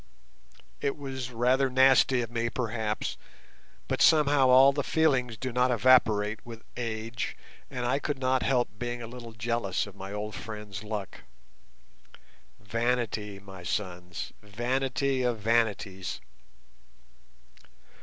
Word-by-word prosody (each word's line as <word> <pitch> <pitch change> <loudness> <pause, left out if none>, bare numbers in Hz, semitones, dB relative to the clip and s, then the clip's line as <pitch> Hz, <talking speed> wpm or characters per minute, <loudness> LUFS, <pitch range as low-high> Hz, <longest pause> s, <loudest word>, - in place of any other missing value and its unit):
It 140 +1 -1
was 135 -3 -5
rather 125 +3 +2
nasty 130 0 +5
of 115 - -7
me, 115 0 -1
perhaps, 110 -3 -2 0.7
but - - -1
somehow 145 -4 +5
all 135 +2 +7
the 145 - 0
feelings 130 -8 +1
do 130 +1 -4
not 125 +1 +2
evaporate 110 -4 +3
with 115 -1 -10
age, 115 -1 -4 0.3
and 125 -1 -4
I 125 +3 +1
could 145 -1 -2
not 130 -1 +1
help 125 -2 +2
being 120 0 -3
a - - -6
little 120 -1 -9
jealous 110 -3 -1
of 100 -2 -12
my 95 0 -8
old 105 +1 -4
friend's 105 +1 -7
luck. 105 -2 -5 1.4
Vanity, 115 -2 -1
my 95 -2 -11
sons; 90 -1 -4
vanity 130 +5 -1
of 120 -2 +1
vanities! 105 -4 0
120 Hz, 125 wpm, -28 LUFS, 105-130 Hz, 1.4 s, all